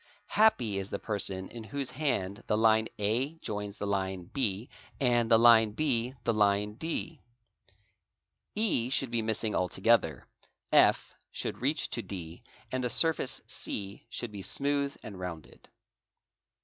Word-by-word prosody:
Happy 125 - +3
is 95 0 -5
the - - -2
person 95 -3 -3
in 115 -2 -8
whose 140 +2 -3
hand 120 -8 -2
the 105 - +2
line 110 0 +4
A 120 +9 0
_ - - -27
joins 105 -4 -5
the - - -4
line 95 -2 -1
B 115 -4 -1 0.3
and 120 -3 +2
the 115 - +7
line 115 -2 +6
B 125 -3 0
the 115 - +1
line 105 0 +2
D; 160 +3 -4 1.3
E 205 - +2
should 135 -2 0
be 120 -1 +1
missing 110 -1 -1
altogether, 95 -2 +2 0.2
_ - - -26 0.3
F - - +4 0.2
should - - -4
reach 145 +4 0
to 120 - -2
D, 85 -6 -7 0.3
and 130 0 -1
the 125 - 0
surface 160 -1 +1
C 100 -1 -6
should 120 - -5
be 100 -2 -7
smooth 140 +5 0
and 100 -4 -8
rounded. 85 -4 -8
115 Hz, 150 wpm, -30 LUFS, 100-130 Hz, 1.3 s, the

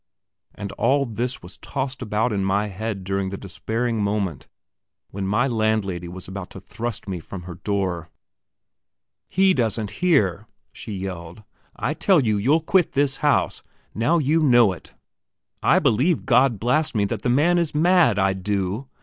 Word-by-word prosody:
And 100 -1 -6
all 140 +1 +1
this 120 +1 -4
was 90 0 -11
tossed 130 -1 -4
about 110 0 0
in 100 -1 0
my 100 +2 0
head 100 0 -4
during 95 0 -2
the 100 - -5
despairing 110 +5 -3
moment 100 -7 -2 0.6
when 95 0 -4
my 110 +7 +2
landlady 110 -7 -1
was 90 +1 -8
about 95 0 -7
to - - -10
thrust 115 +2 -6
me 95 -3 -3
from 90 +2 -9
her 90 0 -8
door. 90 -2 -2 1.2
"He 190 +1 +4
doesn't 110 - -1
hear," 110 - +2 0.3
she 110 - -7
yelled. 95 0 -6 0.3
"I - - -2
tell 190 -4 +3
you, 105 -2 +2
you'll 140 +11 +2
quit 180 +2 +2
this 140 -1 +1
house. 145 -1 +1 0.3
Now 150 +10 +2
you 155 +1 +2
know 120 -8 +5
it. - - -14 0.7
I - - +4
believe 140 +10 +2
God 125 -5 +3
blast 150 +6 +1
me, 105 -2 +2
that 105 +1 -3
the - - -1
man 160 +8 +3
is 165 -3 -2
mad, 170 - +4
I 95 0 +2
do! 100 +5 -2
110 Hz, 165 wpm, -23 LUFS, 95-135 Hz, 1.2 s, know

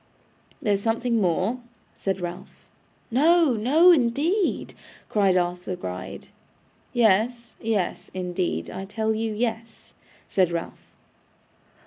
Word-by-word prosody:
'There's 200 -2 +1
something 230 +1 0
more,' 185 +7 +1 0.4
said 195 -1 -2
Ralph. 175 0 -8 0.5
'No, 315 +3 +4
no, 285 +11 +5
indeed,' 320 - +1 0.4
cried 195 -3 +3
Arthur 180 +1 -1
Gride. 90 - -7 0.6
'Yes, 235 +1 +2
yes, 215 -5 -1
indeed. 180 -1 -2
I 190 - -6
tell 220 +2 -1
you 220 0 -2
yes,' 225 +1 -4 0.3
said 185 -3 +2
Ralph. 170 -1 -6
220 Hz, 100 wpm, -25 LUFS, 185-240 Hz, 0.6 s, no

